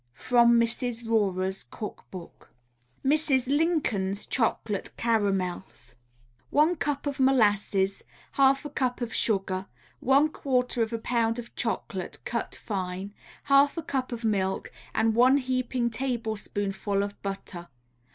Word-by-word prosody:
From 235 -1 +5
Mrs. 235 0 -1
Rorer's 190 - 0
Cook 205 - -8
Book. 180 -3 -11 0.6
MRS. 280 -3 +3
LINCOLN'S 270 - 0
CHOCOLATE 225 -4 -1
CARAMELS 195 - -1 0.6
One 310 +4 +3
cup 295 -3 -2
of 285 -1 -3
molasses, 205 -6 +2 0.3
half 275 +1 +3
a 295 - -5
cup 255 -3 -1
of 235 -1 -3
sugar, 195 -3 0 0.3
one 275 +4 +4
quarter 250 -5 0
of 225 0 0
a 230 - -1
pound 230 0 0
of 235 -1 -8
chocolate 190 -4 -3
cut 235 -1 -3
fine, 190 -1 -4 0.3
half 280 +2 +4
a 330 - -2
cup 265 -3 -2
of 235 -1 -5
milk, 195 -3 0 0.2
and 225 0 +3
one 250 +4 +5
heaping 255 -2 -1
tablespoonful 215 -5 -2
of 200 0 -6
butter. 195 -3 -6
230 Hz, 125 wpm, -27 LUFS, 200-260 Hz, 0.6 s, From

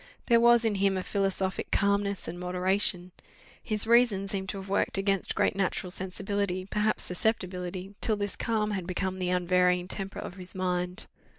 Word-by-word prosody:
There 235 -2 +5
was 235 0 +5
in 220 - +2
him 195 -1 +3
a 185 - -2
philosophic 195 -1 -1
calmness 200 0 +1
and 175 +2 -6
moderation; 180 0 0 0.5
his 215 -1 +1
reason 230 -4 +4
seemed 190 -2 -3
to 200 - -3
have 195 0 -7
worked 195 0 +1
against 195 -1 0
great - - +2
natural 185 -1 -1
sensibility, 190 0 -2
perhaps 210 +2 0
susceptibility, 185 -1 -2
till 220 - +2
this 205 -1 -3
calm 215 -2 0
had 190 -4 -3
become 190 0 -2
the 180 -1 -1
unvarying 180 0 +2
temper 195 +1 -6
of 180 - -7
his 185 0 -9
mind. 180 +1 -2
195 Hz, 170 wpm, -28 LUFS, 180-205 Hz, 0.5 s, There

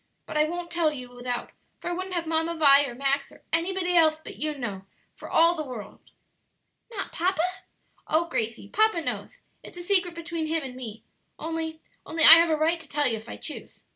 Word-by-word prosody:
But - - -8
I 305 0 +4
won't 345 +2 -5
tell 335 -3 +2
you 255 -4 -8
without, 245 0 -4 0.3
for 350 - -5
I - - -1
wouldn't 370 +1 -4
have 340 -1 -1
Mamma 325 +1 0
Vi, 285 -2 +6
or 240 - -7
Max, 275 +2 -1
or - - -18
anybody 355 +2 0
else 315 -2 +5
but 315 - -11
you 305 -1 -3
know, 200 -7 -5 0.3
for - - -11
all 335 +1 +5
the 315 -3 -4
world." 250 -7 -8 0.9
"Not 435 -5 -5
papa?" 355 0 0 0.6
"Oh, 330 +2 +2
Gracie, 230 -8 -3
papa 435 - +2
knows; - - -5 0.2
it's - - -11
a 350 - -6
secret 355 -2 +1
between 335 -1 -4
him 320 0 -1
and 260 -2 -7
me 230 -4 -8 0.3
only 320 0 -4 0.2
only 325 0 0
I 325 +2 +12
have 335 0 +3
a 315 - +2
right 325 +2 +1
to 320 - -12
tell 290 0 +1
you 230 - 0
if 220 +2 -11
I - - -7
choose." 305 - -6
320 Hz, 210 wpm, -26 LUFS, 275-340 Hz, 0.9 s, I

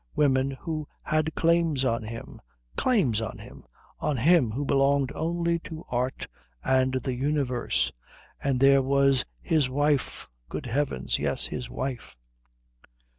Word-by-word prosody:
women 135 -2 +3
who 155 +2 -5 0.2
had 155 0 0
claims 165 -5 +2
on 115 -2 +1
him 115 +1 -8 0.3
claims 155 - +2
on 110 - -5
him! - - -12 0.4
on 150 -3 0
him 155 0 +4
who 135 +7 -3
belonged 140 0 +2
only 170 +1 0
to 160 -1 -9
art 125 +1 -2 0.4
and 130 0 +2
the 130 0 -1
universe. 125 - 0 0.5
And 135 -2 +1
there 135 0 +6
was 135 0 +3 0.2
his 155 -6 +2
wife 145 +1 0 0.2
good - - -5
heavens, 125 - -1
yes, - - 0
his 125 -1 -5
wife.... 130 - -5
135 Hz, 130 wpm, -27 LUFS, 125-150 Hz, 0.5 s, there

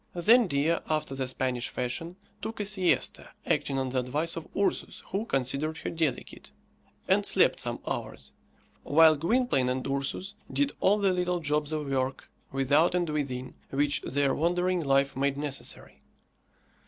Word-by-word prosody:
Then 225 +6 +5
Dea, 155 +2 +1
after 155 -3 -1
the 135 -1 -2
Spanish 130 -1 -1
fashion, 165 +8 -4 0.3
took 225 - -5
a 205 - -1
siesta, 195 -3 +1 0.2
acting 135 - 0
on 130 -1 -1
the 130 0 0
advice 145 +7 -2
of 165 - -6
Ursus, 200 - -1
who 200 +4 -1
considered 140 - -1
her - - -4
delicate, 160 -6 -3 0.6
and - - +3
slept - - +4
some - - -2
hours, 65 0 -5 0.5
while 160 +1 +6
Gwynplaine 165 - +1
and 130 0 -2
Ursus 140 +8 -2 0.2
did 285 0 +1
all 205 +2 +4
the 195 -2 +2
little 180 -1 0
jobs 150 -1 0
of 155 -1 -2
work, 130 -1 -2 0.2
without 145 +6 +3
and 175 -1 +1
within, 130 -4 -3 0.2
which 145 +1 +1
their 140 0 0
wandering 180 +2 +1
life 135 -1 +2
made 140 +1 0
necessary. 145 -2 -4
150 Hz, 155 wpm, -28 LUFS, 135-175 Hz, 0.6 s, while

